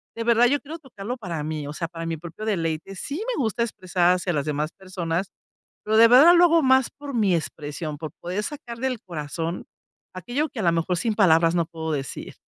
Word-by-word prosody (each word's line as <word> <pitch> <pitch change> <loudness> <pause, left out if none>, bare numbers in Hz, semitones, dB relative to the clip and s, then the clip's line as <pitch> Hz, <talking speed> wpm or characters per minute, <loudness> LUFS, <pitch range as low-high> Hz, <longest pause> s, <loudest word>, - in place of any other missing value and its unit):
de 230 - -3
verdad 235 +1 +4
yo 285 +3 +3
quiero 310 +4 -8
tocarlo 250 -3 -7
para 170 -9 -5
mí, 155 -2 -4
o 145 - -6
sea, 165 +1 -3
para 165 -1 -7
mi 165 -1 -3
propio 170 +6 -8
deleite 170 -2 -2
sí 295 - -5
me 285 - -1
gusta 230 0 0
expresar 185 -5 +1
hacia 180 0 -2
las 145 -1 -1
demás 150 +2 -2
personas, 185 -1 -4 0.5
pero 215 +1 +1
de 230 +1 +8
verdad 290 +9 +8
lo 350 0 +7
hago 335 -2 +5
más 260 -1 +4
por 285 -1 -9
mi 205 -6 +2
expresión, 150 -1 -4
por 155 -1 -6
poder 185 +4 -3
sacar 240 -5 -7
del 255 -3 -2
corazón 165 0 -5 0.5
aquello 245 - -2
que 225 - -6
a - - -1
lo 170 - +4
mejor 170 +2 0
sin 220 +2 0
palabras 165 -4 +4
no 170 -1 +2
puedo 160 -1 -5
decir. 135 -3 -5
185 Hz, 215 wpm, -24 LUFS, 165-235 Hz, 0.5 s, de